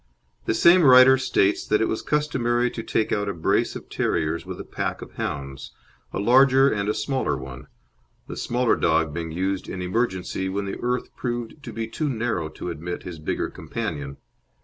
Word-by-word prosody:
The - - 0
same 175 +10 +6
writer 130 -2 +8
states 105 -6 +2
that 105 - +3
it 110 - +2
was 110 - -2
customary 125 -5 0
to 115 - -5
take 110 -1 -1
out 105 0 0
a 100 - -3
brace 80 - +1
of - - -8
terriers 80 0 -1
with - - -6
a - - -5
pack - - -4
of - - -12
hounds, 70 -3 -5 0.4
a - - -4
larger 135 +5 +5
and 100 -1 -1
a - - +2
smaller 130 - -1
one, 65 0 -9 0.6
the - - -6
smaller 125 0 +1
dog 80 -2 +1
being 80 0 -4
used 95 +3 -2
in 95 - -5
emergency 95 -2 -1
when 100 +1 -2
the 95 - -5
earth 125 0 -2
proved 120 +3 -4
to - - -8
be 115 0 -4
too 150 +6 -2
narrow 110 - -2
to 85 +3 -6
admit 85 +2 -6
his 85 -3 -8
bigger 75 - -2
companion. 70 -1 -5
105 Hz, 190 wpm, -24 LUFS, 85-125 Hz, 0.6 s, writer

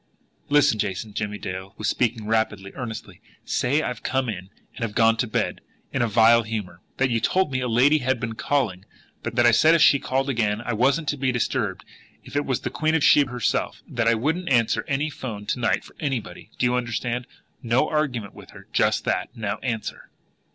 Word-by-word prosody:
"Listen, 145 -7 +4
Jason." 100 +2 -3
Jimmie 105 0 -3
Dale 95 0 -6
was 110 - -2
speaking 115 -3 0
rapidly, 105 -3 -1
earnestly. 120 -4 -7 0.2
"Say 145 +5 +1
that - - -2
I've 125 - -5
come 130 -2 -1
in 95 -3 -6 0.3
and - - -10
have 115 -3 -3
gone 115 -1 +5
to 120 - 0
bed 110 - -2 0.3
in - - 0
a 120 - +2
vile 115 +2 +5
humour. 105 -6 -5 0.2
That 130 -1 +1
you 115 - +2
told 185 +6 +1
me 130 -1 -1
a 125 - -1
lady 130 +6 +4
had 130 -2 0
been 115 -1 -3
calling, 115 -6 -1 0.4
but - - -5
that 120 - +4
I 120 - +7
said 155 +8 +5
if 165 - +3
she 140 - +6
called 135 +1 -1
again 110 -5 0
I 120 +1 -3
wasn't 140 +8 +2
to 145 - -1
be 130 -1 +1
disturbed 120 -2 -1 0.4
if - - -12
it 145 - 0
was 130 -3 0
the - - -4
Queen 155 0 0
of 160 - +1
Sheba 145 -2 +5
herself 125 -2 -1
that 115 -1 -1
I 115 - +5
wouldn't 160 +10 -1
answer 120 -4 +2
any 145 +2 -1
'phone 110 -7 -6
to 115 - -2
night 115 - +1
for - - -16
anybody. 130 - -4
Do - - +1
you 125 - +2
understand? 120 0 -2 0.3
No 125 +4 +2
argument 130 -10 -1
with - - -13
her - - -13
just - - +2
that. - - 0
Now, 105 -3 -3
answer!" 115 -4 -4
120 Hz, 215 wpm, -24 LUFS, 110-135 Hz, 0.4 s, I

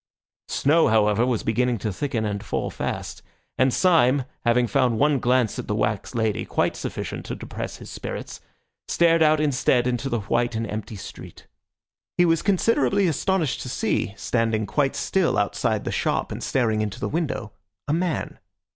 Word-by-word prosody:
Snow, 160 +4 +3
however, 110 +1 +3 0.2
began 120 +2 +1
to 105 0 -3
thicken 120 -1 -2
and 100 -1 -3
fall - - -2
fast; - - -4 0.4
and 130 0 +4
Syme, 140 -6 +3 0.2
having 120 +1 +4
found 120 +1 +1
one 145 +2 +3
glance 125 -3 +1
at - - -5
the 105 - -1
wax 105 +2 -1
lady 110 -2 0
quite - - 0
sufficient - - -5
to - - -4
depress - - -6
his - - -11
spirits, - - -6 0.5
stared 165 -1 +3
out 155 -1 +5
instead 135 -4 +2
into 125 +2 -1
the 120 -3 -1
white 120 +4 0
and 115 +1 -1
empty 110 +1 -5
street. 95 - -10 0.7
He 175 - +5
was 165 -2 +2
considerably 200 +1 +2
astonished 165 -1 0
to 130 - -6
see, 105 -4 -1
standing 115 -2 0
quite 135 +7 0
still 190 -3 +1
outside 100 0 0
the - - -2
shop - - -1
and - - -5
staring 110 -4 +1
into 105 +2 -3
the - - -2
window, 150 -9 -2 0.4
a 145 - +1
man. 170 -1 -2
125 Hz, 165 wpm, -24 LUFS, 110-150 Hz, 0.7 s, out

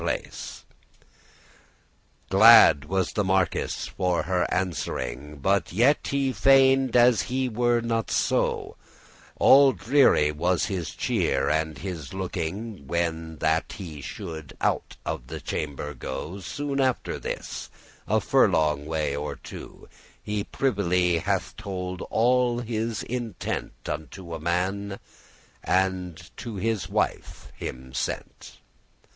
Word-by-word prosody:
*spirit, - - 0
heart - - -9 1.7
Glad 70 - +8
was 95 +1 -1
the 105 - +1
marquis 95 -2 +1 0.3
for 90 -2 +1
her 90 0 0
answering, 75 -6 -3
But 95 +4 +1
yet 125 +10 +3
he 135 -1 0
feigned 135 -1 +4
as 120 -1 +6
he 130 +1 0
were 120 0 +1
not 115 -3 -1
so; - - 0 0.6
All 135 -1 +7
dreary 110 - +4
was 90 +5 +1
his 95 -6 -4
cheer - - 0
and 80 -1 -1
his 90 -4 -6
looking 95 -1 -4
When 80 -1 -2
that 80 +1 +1
he 80 -8 -8
should 80 +1 -8
out - - -1
of - - -4
the - - -6
chamber 75 0 -4
go. 90 +5 -6
Soon 140 +9 -3
after 130 -2 0
this, - - -5 0.4
a - - +3
furlong 75 -2 +2
way 75 -3 -1
or 75 +1 -4
two,<8> - - -11 0.4
He 105 -1 -2
privily 90 -8 +1
hath - - -2
told 90 -2 -5
all 120 +1 +2
his 115 -1 -2
intent 120 -5 -5
Unto 85 +3 -6
a 80 - -4
man, 95 +4 -1 0.7
and 90 -3 -1
to 115 -3 -6
his 110 0 -2
wife - - -2
him 65 0 -7
sent. - - -5
95 Hz, 120 wpm, -26 LUFS, 80-115 Hz, 1.7 s, Glad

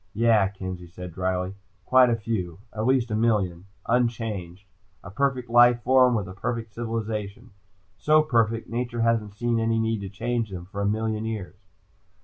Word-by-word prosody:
"Yeah," 110 -3 +4
Kenzie 95 -2 -7
said 90 0 -9
drily. 95 +1 -2 0.3
"Quite 130 -1 +6
a 120 - +2
few. 105 -7 -3 0.2
At 110 +2 -2
least 130 -3 +2
a - - 0
million. 100 -6 0 0.2
Unchanged. 110 -6 -1 0.4
A 100 - -9
perfect 130 +1 0
life 120 0 +5
form 130 -1 +5
with 105 -4 -2
a 90 - -8
perfect 110 +3 -4
civilization. 115 -1 -4 0.5
So 155 0 +4
perfect, 115 -5 +1
nature 120 0 -3
hasn't 115 -3 +1
seen 120 +1 0
any 115 0 +1
need 110 -1 0
to 100 - -5
change 115 +3 -2
them 90 -2 -7
for 100 +2 -6
a 100 - +1
million 110 +1 -1
years." 110 -5 -5
110 Hz, 165 wpm, -25 LUFS, 100-120 Hz, 0.5 s, Quite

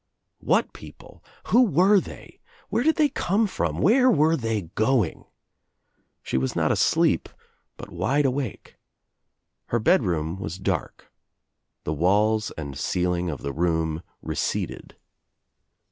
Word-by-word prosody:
What - - +1
people - - -14 0.2
I - - -12
Who 240 - +5
were 195 - +4
they? - - -11 0.3
Where 230 - 0
did 320 +5 +3
they 310 -3 +3
come 205 0 0
from? 85 - -2
Where 250 - +5
were 160 - +3
they 115 - -2
going? 110 -4 0 1.0
She 65 - -1
was 65 0 -2
not - - +1
asleep - - +2 0.5
but - - -10
wide 145 +2 0
awake. 130 -4 -3 0.9
Her 120 - 0
bedroom 95 - +1
was 90 -2 -5
dark. 95 - -4 0.7
The 75 - -2
walla 105 +7 +2 0.2
and 70 -4 -6
ceiling 90 +2 -1
of 75 - -6
the 70 0 -3
room 80 -1 -1 0.2
receded. - - -3
110 Hz, 130 wpm, -24 LUFS, -, 1.0 s, Who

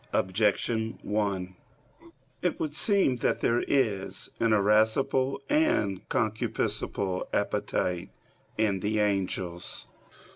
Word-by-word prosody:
Objection 110 +3 +1
1: 100 -3 -1 0.9
It - - -1
would 155 -2 -2
seem 190 - +3
that - - 0
there 120 +1 +2
is 110 -9 0
an 115 -1 +2
irascible 110 +6 +3
and 295 - +2
a - - -26
concupiscible 100 -3 -1
appetite 90 -1 -1 0.5
in 105 -3 +1
the 105 +3 -1
angels. 95 -4 -2
105 Hz, 100 wpm, -28 LUFS, 95-120 Hz, 0.9 s, seem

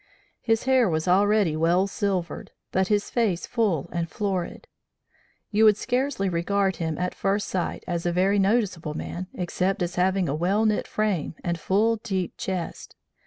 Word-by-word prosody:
His 225 -2 +1
hair 260 -5 +4
was 160 +1 -1
already 200 -2 +3
well 170 +4 +3
silvered, 195 -3 -2 0.2
but 190 0 +1
his 205 0 0
face 215 -8 0
full 200 - 0
and 170 -1 -2
florid. 195 -4 -3 0.9
You 215 +1 +3
would 210 -1 +6
scarcely 255 -4 -1
regard 190 +1 0
him, 160 -2 -2
at 180 0 -2
first 200 +1 -1
sight, 180 -2 -2
as 170 -2 -2
a - - +2
very 190 +3 +2
noticeable 190 -7 +1
man, 180 +3 -5
except 185 +1 -1
as 175 +1 -4
having 190 0 +2
a 140 - -1
well 190 +8 +1
knit 215 -1 +1
frame 205 -8 -1
and 170 -1 -2
full, 220 +6 +2
deep 190 -5 -3
chest. 185 -3 -5
190 Hz, 165 wpm, -25 LUFS, 175-210 Hz, 0.9 s, would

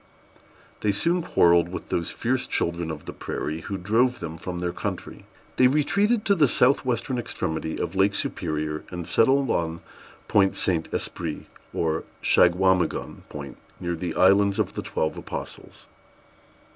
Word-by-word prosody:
They 105 - +1
soon 170 - +1
quarrelled 85 - +4
with 95 - -7
those 85 - -1
fierce 130 +2 -1
children 85 -1 -1
of 80 -2 -6
the - - -6
prairie, 80 +2 -4
who 100 - -4
drove 115 +7 +2
them 80 -1 -5
from 90 +2 -6
their 90 0 -2
country. - - -5 0.3
They 130 - +6
retreated 200 - +2
to 200 - +4
the 155 -7 +4
south 130 +3 +3
western 125 0 -1
extremity 80 -7 -3
of - - -2
Lake 100 +1 +2
Superior, 75 -4 -2
and 90 -2 -6
settled 135 +3 +3
on 85 0 -1 0.5
Point 95 -2 +3
Saint 85 -4 0
Esprit, 80 -3 -4 0.3
or 80 -1 -1 0.2
Shagwamigon 90 0 +2
Point, - - -8 0.2
near 85 -1 -2
the 85 0 -4
Islands 100 +1 +4
of - - 0
the - - -3
Twelve 80 - -2
Apostles. - - -8
95 Hz, 150 wpm, -25 LUFS, 85-125 Hz, 0.5 s, They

